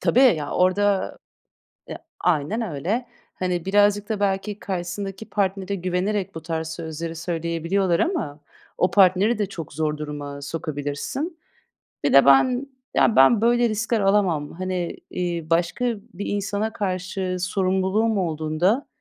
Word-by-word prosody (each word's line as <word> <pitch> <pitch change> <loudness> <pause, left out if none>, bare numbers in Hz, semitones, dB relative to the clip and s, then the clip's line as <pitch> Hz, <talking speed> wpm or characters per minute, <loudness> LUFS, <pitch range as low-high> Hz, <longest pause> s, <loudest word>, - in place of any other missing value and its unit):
Tabii 250 - +3
ya, 160 - +4
orada 195 +2 +2 0.7
Eee, - - -6 0.2
aynen 180 +6 +1
öyle, 205 - -2 0.3
hani, 180 -2 -2
birazcık 205 +1 +3
da 215 - -1
belki 200 +1 -1
karşısındaki 195 +3 -5
partnere 195 -1 -1
güvenerek 185 +1 -1
bu 160 - -5
tarz 160 0 -3
sözleri 165 0 -5
söyleyebiliyorlar 170 +2 0
ama 240 - -1 0.4
o 180 - +2
partneri 195 +4 +4
de 205 - +2
çok 165 -7 -8
zor 155 0 -1
duruma 145 -1 -6
sokabilirsin. 155 - -4 0.6
Bir - - +2
de 140 - +8
ben, 245 - +4 0.3
ya, 225 - +3
ben, 170 - +6
böyle, 240 +1 +3
riskler 225 +1 0
alamam. 190 -7 +2
Hani, 185 -1 -3
iii, 170 -3 -3
başka 175 +8 +1 0.3
bir 195 +3 -5
insana 205 +2 -2
karşı 185 -1 -2
sorumluluğum 190 +3 +1
olduğunda, 170 - 0
185 Hz, 130 wpm, -23 LUFS, 165-205 Hz, 0.7 s, de